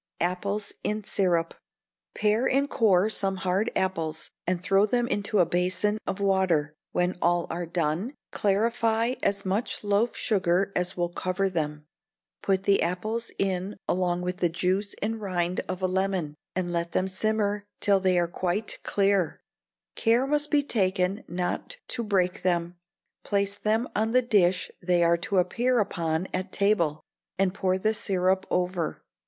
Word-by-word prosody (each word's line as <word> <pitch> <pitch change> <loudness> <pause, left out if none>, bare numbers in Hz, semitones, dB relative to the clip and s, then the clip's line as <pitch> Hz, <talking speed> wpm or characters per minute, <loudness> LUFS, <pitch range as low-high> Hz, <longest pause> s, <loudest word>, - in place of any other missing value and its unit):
Apples 200 +4 -1
in 210 0 -1
Syrup. 175 -4 +1 0.6
Pare 215 +4 +2
and 275 +2 +2
core 205 -7 +3
some 195 -3 0
hard 190 +4 0
apples, 165 -4 -2 0.2
and 180 0 +1
throw 195 +3 +3
them 240 +2 +1
into 205 -3 -1
a 180 - +5
basin 185 +5 0
of 190 - -2
water. 190 -7 +2 0.2
When 180 0 0
all 175 0 +2
are 170 +1 -3
done, 170 - -1 0.2
clarify 225 +3 +1
as 200 0 0
much 200 +5 -1
loaf 205 +3 +1
sugar 190 -2 +1
as 180 0 -1
will 175 -1 0
cover 185 +2 -1
them; 150 -3 -3 0.6
put 190 -1 +1
the 200 0 +3
apples 215 +6 -2
in 190 +1 -1
along 180 -1 0
with 180 0 -2
the 175 -2 +2
juice 185 +4 0
and 225 +1 -2
rind 180 -2 -1
of 185 0 -4
a - - +4
lemon, 185 -4 0 0.2
and 180 -1 -1
let 170 0 -2
them 185 - +1
simmer 205 +1 -1
till 200 -1 +3
they 185 -1 +2
are 175 -1 +2
quite 185 +5 -2
clear; 195 -4 +1 0.6
care 235 +3 +3
must 295 +1 +1
be 295 -1 +3
taken 190 -4 0
not 180 - -3
to 235 - -2
break 185 -4 +1
them; 175 -1 0 0.5
place 200 -1 0
them 220 +4 0
on 220 +2 +1
the 255 0 +4
dish 185 -5 +2
they 175 -1 +2
are 170 0 +4
to 190 +3 -2
appear 240 +8 +2
upon 170 -4 -1
at 185 +1 -3
table, 175 -7 +1 0.3
and 190 -1 +2
pour 185 -1 0
the 215 +3 +1
syrup 190 -2 0
over. 180 -2 -1
190 Hz, 160 wpm, -27 LUFS, 180-210 Hz, 0.6 s, a